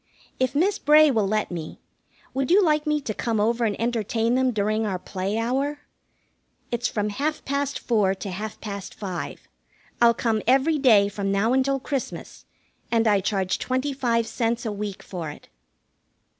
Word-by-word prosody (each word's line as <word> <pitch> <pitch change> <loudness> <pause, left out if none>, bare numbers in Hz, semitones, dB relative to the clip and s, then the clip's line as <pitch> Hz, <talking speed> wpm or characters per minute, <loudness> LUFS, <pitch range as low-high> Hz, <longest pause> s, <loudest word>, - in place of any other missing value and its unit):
If 260 +1 0
Miss 370 +7 +2
Bray 300 0 +6
will 215 -5 +1
let 215 0 -1
me, 165 -3 -6 0.5
would 265 0 -1
you 390 +4 +6
like 305 -2 +2
me 300 0 +2
to 220 - -3
come 225 0 -1
over 230 +3 +1
and 210 -2 -1
entertain 230 0 0
them 260 0 +3
during 215 -1 0
our 200 -4 -1
play 190 +3 -3
hour? 270 +6 -1 0.9
It's 240 0 0
from 210 -1 -1
half 290 +8 -2
past 280 0 -1
four 205 -5 +1
to 195 0 -6
half 210 +3 -6
past 200 -3 -7
five. 185 -4 -6 0.5
I'll 235 -1 +6
come 225 -3 0
every 275 +5 +3
day 220 -7 +5
from 200 -1 -3
now 205 +5 +2
until 270 +1 +2
Christmas, 275 -1 -5 0.5
and 230 -1 +3
I 205 -2 +4
charge 190 -1 -1
twenty 260 +2 -1
five 235 -4 +1
cents 235 0 -1
a 220 - -1
week 205 -1 -5
for 170 -5 -5
it." 150 - -12
230 Hz, 170 wpm, -24 LUFS, 205-265 Hz, 0.9 s, Bray